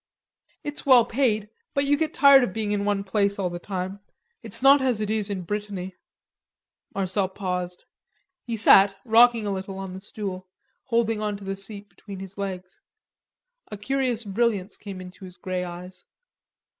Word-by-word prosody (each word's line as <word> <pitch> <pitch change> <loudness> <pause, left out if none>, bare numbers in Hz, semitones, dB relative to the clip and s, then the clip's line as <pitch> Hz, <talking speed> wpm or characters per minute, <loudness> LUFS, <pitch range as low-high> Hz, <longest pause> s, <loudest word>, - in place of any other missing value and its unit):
"It's 295 0 -5
well 255 -5 +6
paid; 220 -4 0 0.2
but 280 0 +2
you 285 +1 +3
get 310 +1 -1
tired 280 -3 +7
of 195 - -2
being 215 -1 -2
in 200 -1 0
one 205 -1 0
place 200 0 0
all 185 -3 -1
the 175 - -5
time. 190 +1 -5 0.4
It's - - -3
not 275 +1 +7
as 255 -5 +1
it 215 -1 -2
is 215 -2 -1
in 190 -3 -3
Brittany...." 195 -1 -5 1.0
Marcel 190 0 0
paused. 180 -2 -4 0.6
He 230 -2 -4
sat, 195 -1 +7
rocking 235 -1 +5
a 200 - -1
little 190 0 -5
on 195 -1 -6
the 190 - -7
stool, 190 -3 -6 0.4
holding 230 -3 0
on 210 -1 -2
to 200 - -13
the 195 0 -3
seat 200 +1 -7
between 200 -1 -11
his 195 0 -9
legs. 185 -2 -6 0.9
A 210 - -5
curious 245 +1 -1
brilliance 205 -1 0
came 195 -3 -8
into 180 +1 -12
his 180 -1 -11
grey 185 -1 -3
eyes. 180 +1 -9
200 Hz, 170 wpm, -25 LUFS, 190-225 Hz, 1.0 s, tired